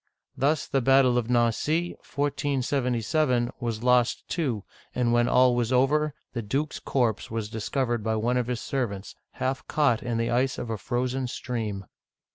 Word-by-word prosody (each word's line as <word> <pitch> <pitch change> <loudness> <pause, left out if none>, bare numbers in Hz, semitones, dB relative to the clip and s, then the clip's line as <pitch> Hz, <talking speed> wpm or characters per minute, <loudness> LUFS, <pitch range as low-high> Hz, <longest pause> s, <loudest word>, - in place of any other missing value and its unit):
Thus 145 +2 +1
the 135 - 0
battle 135 0 +5
of 120 -1 -5
Nan'cy 125 +8 +1
(1477) 135 -2 0
was 115 -2 -3
lost, 125 -1 +2
too, 130 - -1 0.3
and 120 -1 +2
when 120 0 +3
all 125 0 +4
was 120 0 0
over, 145 +4 +2 0.2
the 120 - -2
duke's 140 +8 -2
corpse 120 -6 0
was 110 -2 -3
discovered 120 +1 -1
by 110 0 0
one 120 +3 +1
of 125 -1 0
his 125 -2 -2
ser 135 -3 -1
vants, 100 -1 -8 0.2
half 130 0 -3
caught 145 -7 +2
in 120 -2 -2
the 115 0 0
ice 130 +2 +1
of 115 - -4
a 110 - -2
frozen 125 +2 -1
stream. 110 -6 -4
125 Hz, 165 wpm, -26 LUFS, 115-135 Hz, 0.3 s, battle